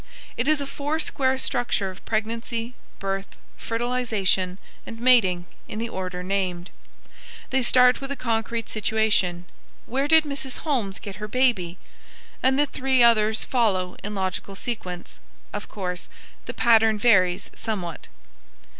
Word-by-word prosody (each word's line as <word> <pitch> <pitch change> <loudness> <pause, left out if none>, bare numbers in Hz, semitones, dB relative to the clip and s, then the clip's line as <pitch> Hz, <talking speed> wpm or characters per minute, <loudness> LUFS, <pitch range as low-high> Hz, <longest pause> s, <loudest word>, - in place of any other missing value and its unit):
It 235 - -1
is 310 -1 +4
a 280 - -3
foursquare 280 -2 0
structure 240 -7 0
of 185 - -15
pregnancy, 230 +2 -2 0.2
birth, 195 0 -4 0.2
fertilization, 225 -6 0 0.3
and 225 - -9
mating, 210 -8 +4 0.2
in 215 - -6
the 230 +1 -3
order 185 -3 -4
named. 185 -2 -2 0.8
They 265 0 +2
start 250 +1 +5
with 270 0 -5
a - - -1
concrete 230 -2 -2
situation 210 -5 +1 0.4
"Where 270 +3 -1
did 320 0 +6
Mrs. 280 -3 -4
Holmes 230 -11 0
get 195 -2 -8
her 210 +1 -5
baby?" 210 -8 +1 0.6
and 265 +1 +3
the 290 - +4
three 265 -3 +2
others 220 -2 +4
follow 195 -8 +1
in 210 +1 -4
logical 190 +1 -3
sequence. 185 -6 -6 0.3
Of - - -5
course, 180 -3 -5 0.4
the 240 - -4
pattern 225 -2 +4
varies 185 -5 +3
somewhat. 185 -8 -5
225 Hz, 135 wpm, -24 LUFS, 190-250 Hz, 0.8 s, did